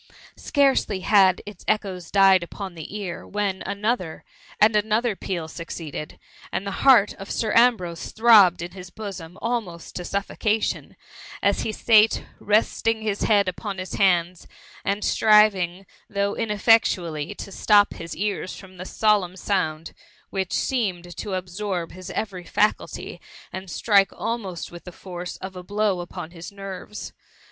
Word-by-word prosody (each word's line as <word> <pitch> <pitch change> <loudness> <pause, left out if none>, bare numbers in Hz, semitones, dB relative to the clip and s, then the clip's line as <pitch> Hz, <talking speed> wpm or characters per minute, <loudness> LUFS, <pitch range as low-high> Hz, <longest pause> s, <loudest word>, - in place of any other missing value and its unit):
Scarcely 270 -9 +1
had 190 -2 +4
its 205 -3 -10
echoes 185 -5 -1
died 195 -2 +5
upon 190 +2 -7
the 165 +5 -7
ear, 190 -4 -6
when 200 -2 -2
another^ 200 -5 -2 0.4
and 215 +1 +5
another 215 +2 +1
peal 175 -4 -4
succeeded; 160 -2 -7 0.3
and 195 - -2
the 200 - -4
heart 245 -7 +6
of 195 - -8
Sir 220 -2 -1
Ambrose 215 -9 +3
throbbed 210 -7 +6
in 175 - -6
his 185 -1 -10
bosom 190 -4 -8
almost 220 -8 -3
to 180 - -4
suf 200 +3 -2
focation, 215 0 -1 0.5
as - - +2
he - - -2
sate, 220 0 +4 0.2
resting 220 +1 +1
his 205 -2 -1
head 205 -3 +3
upon 195 +2 -4
his 185 0 -6
hands, 180 -3 +1 0.4
and 200 +1 -1
striving, 195 -4 +4 0.2
though 200 -1 -1
ineffectually, 195 -8 +2
to 195 - -8
stop 205 +1 +4
his 165 0 -7
ears 200 -1 -2
from 185 -1 -13
the 180 - -7
solemn 205 -4 +1
sound, 165 -5 -2 0.4
which 190 -2 -2
seemed 180 -9 -1
to 200 -2 -4
absorb 185 -1 -3
his 185 0 -9
every 190 -5 -4
faculty, 210 +4 -1 0.3
and 190 0 -6
strike 200 +1 +3
almost 210 -6 -4
with 175 0 -10
the 180 - -9
force 180 0 -7
of 190 0 -8
a 180 - -6
blow 205 0 0
upon 175 -1 -7
his 170 +2 -9
nerves. 195 +1 -8
195 Hz, 150 wpm, -24 LUFS, 180-210 Hz, 0.5 s, heart